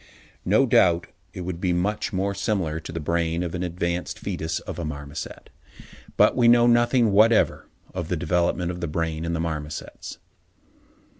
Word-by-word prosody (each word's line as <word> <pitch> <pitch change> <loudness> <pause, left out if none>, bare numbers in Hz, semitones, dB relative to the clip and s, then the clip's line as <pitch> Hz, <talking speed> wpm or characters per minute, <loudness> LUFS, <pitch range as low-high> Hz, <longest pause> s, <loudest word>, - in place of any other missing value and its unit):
No - - +4
doubt 85 -1 +4 0.3
it - - -7
would 90 -1 -5
be 90 -2 +1
much 100 +6 -1
more 100 +1 -1
similar 95 -5 -1
to 80 - -8
the 85 - -4
brain 85 +2 -1
of 85 -2 -4
an 90 - -3
advanced 85 0 -2
foetus 80 +1 -3
of - - -7
a - - -3
marmoset. 75 -1 -7 0.7
But - - +5
we 120 -2 +4
know 120 0 +6
nothing 120 -1 +4
whatever 110 +3 +3 0.3
of 90 -3 -4
the 90 - -1
development 90 +1 0
of 90 0 -7
the 85 - -2
brain 80 +1 -2
in 85 - -2
the 85 - -1
marmosets. 75 -2 -5
85 Hz, 170 wpm, -24 LUFS, 80-100 Hz, 0.7 s, know